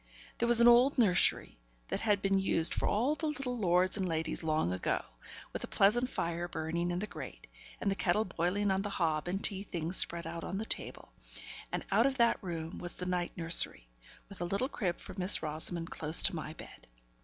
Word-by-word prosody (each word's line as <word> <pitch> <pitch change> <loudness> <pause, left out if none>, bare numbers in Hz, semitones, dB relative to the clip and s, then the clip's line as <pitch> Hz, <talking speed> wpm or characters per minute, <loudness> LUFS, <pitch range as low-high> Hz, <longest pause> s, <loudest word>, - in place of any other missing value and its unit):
There 235 - +1
was 240 -1 +7
an 235 - +7
old 245 +4 +5
nursery, 180 - +2 0.3
that - - -2
had 205 -3 0
been 195 0 +2
used 165 -4 +3
for - - -1
all 240 +8 +1
the 315 +1 -3
little 275 -4 -3
lords 185 0 +2
and 190 -3 -2
ladies 160 0 -2
long 155 - 0
ago, 90 - -2 0.5
with - - -5
a - - -5
pleasant 240 +6 +2
fire 170 -3 -3
burning 170 +1 -3
in 175 - -2
the 200 - -2
grate, - - -9 0.3
and 200 - 0
the - - +2
kettle 195 +3 0
boiling 190 +3 -1
on 190 0 +1
the 205 - -4
hob, 165 -5 -1
and 190 +3 -3
tea 195 -1 -2
things 175 -2 -2
spread 170 0 +2
out 165 0 -6
on 190 - -4
the 215 - -3
table; - - -3 0.6
and - - -4
out 225 +6 +4
of 270 -1 -2
that 235 -1 +2
room 165 -4 -6
was 175 - -6
the 180 - -6
night 180 -1 -2
nursery, 165 - +1 0.4
with 200 -3 -10
a - - -1
little 200 +8 -1
crib 185 -11 -3
for - - -10
Miss 185 -1 +5
Rosamond 165 +2 -1
close 155 +1 +2
to 195 - +3
my 155 -1 -6
bed. - - -13
180 Hz, 210 wpm, -32 LUFS, 170-210 Hz, 0.6 s, was